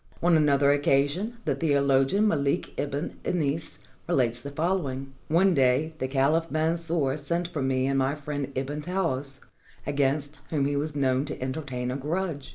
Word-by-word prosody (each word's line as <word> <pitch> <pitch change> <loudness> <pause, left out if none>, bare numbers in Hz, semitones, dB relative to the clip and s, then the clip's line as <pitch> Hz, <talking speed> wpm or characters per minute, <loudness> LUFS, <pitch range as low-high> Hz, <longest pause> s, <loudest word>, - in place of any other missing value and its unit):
On 175 -1 +5
another 140 -2 +4
occasion 145 - +1
the - - +2
theolo 140 -4 +3
gian 200 +11 +1
MaKk 145 -9 +1
Ibn 145 +2 -3
Anas 155 -2 -1 0.3
relates 120 -8 +1
the 140 - -6
following: 140 -4 -2
"One 180 +4 +4
day 135 +3 +2
the 130 - -1
caliph 145 +5 +2
Mansur 160 -3 0
sent 170 +4 -1
for 155 -5 -3
me 130 -1 +1
and 135 0 +1
my 135 +2 +1
friend 145 -2 -4
Ibn 140 +3 -3
Taous, 145 -6 -2 0.4
against 145 +1 0
whom 145 -4 +1
he 145 +1 0
was 145 +1 -2
known 130 -2 +2
to 150 - -5
entertain 130 -2 -3
a 130 - -2
grudge. 155 0 -3
145 Hz, 165 wpm, -27 LUFS, 135-160 Hz, 0.4 s, On